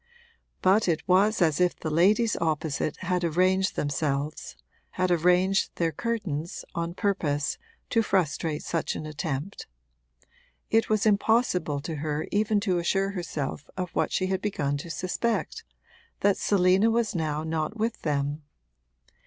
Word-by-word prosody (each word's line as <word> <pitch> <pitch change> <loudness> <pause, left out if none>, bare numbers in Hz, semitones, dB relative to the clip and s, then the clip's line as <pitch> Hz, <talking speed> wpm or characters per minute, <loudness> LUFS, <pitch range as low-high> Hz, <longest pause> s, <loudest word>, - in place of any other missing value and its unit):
But 195 +3 +4
it 165 +1 0
was 195 +2 +4
as 160 0 +2
if 180 -1 +3
the 155 - -3
ladies 210 +8 +3
opposite 155 -2 -1
had 180 -1 -1
arranged 185 +3 +2
themselves, 145 0 -2 0.4
had 185 -1 +1
arranged 180 +3 +2
their 165 -1 0
curtains, 180 -8 -3
on 170 +1 -3
purpose 155 -9 -1 0.3
to 230 - +4
frustrate 165 -6 0
such 165 - -2
an 155 - -5
attempt: 155 +3 -4 1.0
it 225 0 +3
was 215 -1 +2
impossible 200 - +2
to 160 +1 -5
her 150 +1 -2
even 210 0 +2
to 185 -4 +1
assure 195 +3 +1
herself 150 -6 -4
of 180 -2 -3
what - - 0
she 185 - 0
had 190 0 -1
begun 145 -9 -1
to 155 +4 -8
suspect, 185 +3 -2 0.6
that 200 -1 +4
Selina 190 +2 +3
was 230 -1 +1
now 155 -2 -1
not 160 +5 -2
with 225 +1 -2
them. 145 0 -1
180 Hz, 140 wpm, -27 LUFS, 155-200 Hz, 1.0 s, But